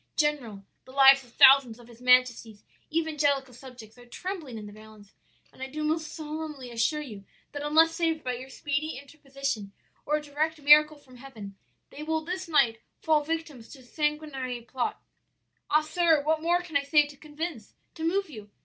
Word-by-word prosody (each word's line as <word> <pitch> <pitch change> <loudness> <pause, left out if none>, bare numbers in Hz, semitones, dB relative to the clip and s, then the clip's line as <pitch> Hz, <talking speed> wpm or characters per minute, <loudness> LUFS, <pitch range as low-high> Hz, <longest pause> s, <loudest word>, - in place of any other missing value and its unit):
General, 250 -10 -1 0.2
the 260 - -14
lives 270 0 +6
of 245 - -20
thousands 265 -4 +6
of 240 -1 -16
his 240 0 -17
majesty's 250 -4 +2 0.3
evangelical 290 -5 0
subjects 245 -2 -13
are 245 - -15
trembling 325 - -6
in 215 - -8
the 205 - -11
balance, 215 -1 -16 0.4
and - - -17
I 265 - -4
do 305 +3 -5
most 315 +1 -1
solemnly 305 -4 -7
assure 235 +7 0
you 210 -8 -10 0.3
that 290 - -6
unless 320 +3 +3
saved 325 -2 -1
by 250 - -2
your 255 +2 -9
speedy 290 +3 -3
interposition, 275 -7 -6 0.3
or 300 - 0
a 300 - -1
direct 305 +2 -2
miracle 300 +1 +6
from 255 -3 -18
Heaven, 220 -7 -11 0.4
they 295 - -10
will 320 +1 -1
this 365 +3 -5
night 235 -8 +2 0.2
fall 310 -2 +2
victims 310 -6 -5
to 270 - -13
a - - -18
sanguinary 295 -3 -3
plot. 245 +1 -4 0.7
"'Ah, 305 - +4
sir, 320 -1 +2
what 310 +1 0
more 350 +2 +1
can 330 -4 -12
I 285 - +4
say 295 +1 +3
to 290 0 -12
convince, 300 -4 -7 0.2
to 320 - -8
move 390 +4 0
you? 215 -9 -11
285 Hz, 185 wpm, -27 LUFS, 250-310 Hz, 0.7 s, lives